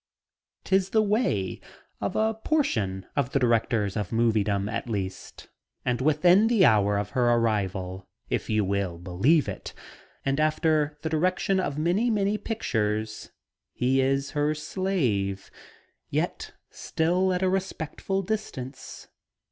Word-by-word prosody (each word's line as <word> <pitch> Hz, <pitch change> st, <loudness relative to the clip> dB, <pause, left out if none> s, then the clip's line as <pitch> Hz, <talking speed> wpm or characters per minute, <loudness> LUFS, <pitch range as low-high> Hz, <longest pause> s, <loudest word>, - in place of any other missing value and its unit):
'Tis 190 Hz, 0 st, +2 dB
the 220 Hz, +1 st, +3 dB
way 200 Hz, -, 0 dB, 0.4 s
of -, -, -3 dB
a 220 Hz, +1 st, +2 dB
portion 110 Hz, -, -1 dB
of 135 Hz, -2 st, -1 dB
the 140 Hz, -, +3 dB
directors 115 Hz, -4 st, +1 dB
of 105 Hz, -4 st, -2 dB
moviedom, 105 Hz, -3 st, +1 dB
at 110 Hz, +2 st, -4 dB
least. 95 Hz, -4 st, -5 dB, 0.4 s
And 125 Hz, 0 st, 0 dB
within 175 Hz, +8 st, +4 dB
the 225 Hz, -6 st, +4 dB
hour 105 Hz, -1 st, +4 dB
of 100 Hz, 0 st, -3 dB
her 125 Hz, -2 st, +2 dB
arrival, 95 Hz, -5 st, 0 dB, 0.2 s
if -, -, -2 dB
you 110 Hz, -2 st, +2 dB
will 95 Hz, -3 st, -1 dB
believe 95 Hz, -, +2 dB
it, -, -, -6 dB, 0.5 s
and 135 Hz, +1 st, 0 dB
after 155 Hz, -1 st, +1 dB
the 160 Hz, -, -1 dB
direction 185 Hz, +4 st, +1 dB
of 145 Hz, -6 st, -2 dB
many, 180 Hz, +10 st, +1 dB
many 210 Hz, -1 st, +1 dB
pictures, 110 Hz, -, -2 dB, 0.4 s
he 130 Hz, +2 st, +2 dB
is 135 Hz, +1 st, 0 dB
her 150 Hz, 0 st, 0 dB
slave, 140 Hz, -, -1 dB, 0.6 s
yet -, -, -2 dB, 0.2 s
still 180 Hz, +4 st, 0 dB
at 180 Hz, +1 st, 0 dB
a -, -, +3 dB
respectful 190 Hz, 0 st, -2 dB
distance. 145 Hz, -11 st, -5 dB
135 Hz, 130 wpm, -26 LUFS, -, 0.6 s, within